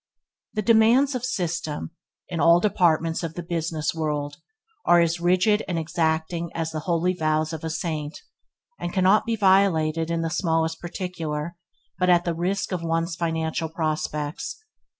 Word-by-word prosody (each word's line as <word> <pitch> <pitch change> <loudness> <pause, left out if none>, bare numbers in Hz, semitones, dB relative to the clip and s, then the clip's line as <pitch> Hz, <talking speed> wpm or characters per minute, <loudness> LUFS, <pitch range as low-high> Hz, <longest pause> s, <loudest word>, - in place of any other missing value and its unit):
The 215 - 0
demands 235 +5 +5
of 250 -2 -3
system, 170 - -3 0.4
in 170 -2 -4
all 170 +3 +6
departments 165 -4 +2
of 165 -2 -5
the 175 - -5
business 165 -2 -2
world, 150 -2 -2 0.5
are 175 0 +5
as 170 0 +2
rigid 185 +5 +3
and 175 - -2
exacting 160 +1 -1
as 165 -1 -2
the 155 - -3
holy 175 +2 +2
vows 155 -1 0
of 160 - -6
a 160 - -2
saint, 155 -2 -3 0.6
and 175 - -3
cannot 190 +4 +3
be 230 - +1
violated 175 -6 +3
in 170 0 0
the 165 - -2
smallest 165 -2 0
particular 170 -3 -4 0.4
but 180 0 +2
at 175 -1 +4
the 170 - 0
risk 185 +5 -2
of 180 -2 -2
one's 165 0 -1
financial 160 -1 -2
prospects. 155 - -3
165 Hz, 155 wpm, -24 LUFS, 160-180 Hz, 0.6 s, all